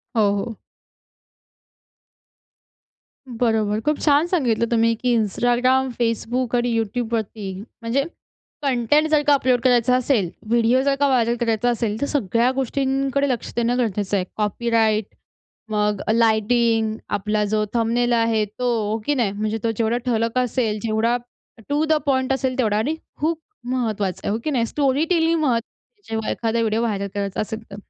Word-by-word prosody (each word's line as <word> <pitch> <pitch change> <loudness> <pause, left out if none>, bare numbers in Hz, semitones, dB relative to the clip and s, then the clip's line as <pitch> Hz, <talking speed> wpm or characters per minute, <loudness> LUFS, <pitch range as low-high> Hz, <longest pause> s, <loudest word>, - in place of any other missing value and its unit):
हो, 225 - +3
हो. 220 +3 -3 2.7
बरोबर, 220 -3 0
खूप 300 +4 0
छान 295 +2 +3
सांगितलं 250 -11 +1
तुम्ही 230 0 +3
की 245 -1 +2
Instagram, 245 +4 +2
Facebook 235 +2 -1
आणि 240 0 +1
YouTubeवरती 220 -3 -3 0.3
म्हणजे 235 +4 0 0.6
कंटेंट 275 +3 +2
जर 305 -1 +4
का 290 - +6
अपलोड 255 -3 +2
करायचा 245 -1 +3
असेल, 250 -7 +1 0.2
व्हिडिओ 235 +2 +3
जर 280 0 +2
का 285 - +3
व्हायरल 240 -3 +2
करायचा 230 0 +1
असेल 230 -2 -1
तर - - +2
सगळ्या 240 -2 +1
गोष्टींकडे 270 +1 0
लक्ष 245 -3 -2
देणं 240 +1 +1
गरजेचं 205 -4 -1
आहे. 185 - -1
कॉपीराईट 220 0 +1 0.7
मग 210 -1 0
लाईटिंग, 225 0 +2
आपला 210 +1 0
जो 215 +1 0
थंबनेल 240 +1 +1
आहे 230 -2 +2
तो 215 +5 -6 0.2
हो 220 - 0
की 295 - +2
नाही? 235 -7 +1
म्हणजे 215 +2 -2
तो 230 - +1
जेवढा 230 +1 +1
ठळक 230 0 0
असेल, 235 -3 0
जेवढा 225 +1 +1 0.5
टु 290 +2 +1
द 315 - +2
पॉइंट 260 -1 +1
असेल 260 -1 -1
तेवढा 215 -4 +2
आणि 280 +9 0 0.3
खूप 320 +1 0 0.3
महत्वाचा 210 -7 -1
आहे. - - -1
हो 220 - 0
की 310 - -1
नाही? 240 -5 +1
स्टोरी 280 +3 +1
टेलिंग 330 -2 +2
महत्त्वाची 270 - -3
जेव्हा 220 -1 -2
एखादा 230 0 -1
व्हिडिओ 225 0 +1
व्हायरल 205 -4 -1
करायचा 200 -1 -2
असेल 220 +1 -5
तर. - - -7
235 Hz, 155 wpm, -22 LUFS, 220-260 Hz, 2.7 s, का